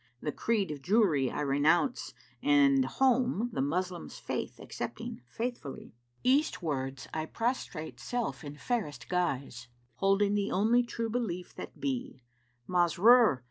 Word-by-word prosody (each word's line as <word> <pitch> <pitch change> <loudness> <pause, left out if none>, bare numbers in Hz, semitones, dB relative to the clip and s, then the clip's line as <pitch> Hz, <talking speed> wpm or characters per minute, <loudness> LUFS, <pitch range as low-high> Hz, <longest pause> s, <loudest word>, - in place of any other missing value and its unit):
The 150 - -3
creed 205 -1 0
of 145 -2 -6
Jewry 175 - +3
I - - -3
renounce 150 - +1 0.3
and 140 -2 +4
home, 245 - +1
* - - -18
The - - -1
Moslem's 175 +5 -2
Faith - - -4
accepting - - -6
faithfully 225 - -5 0.3
Eastwards[FN#362] 150 - 0
I 155 0 -2
prostrate 160 - -3
self 240 - -3
in 145 -1 -7
fairest 145 - -3
guise 135 -8 -2
* 120 0 -39
Holding 195 +1 +3
the 205 -1 0
only 225 +5 +4
True 230 -2 -3
Belief 195 -7 -3
that - - -9
be: 265 - -3 0.4
Masrúr! 185 - +5
180 Hz, 135 wpm, -30 LUFS, 145-235 Hz, 0.4 s, Masrúr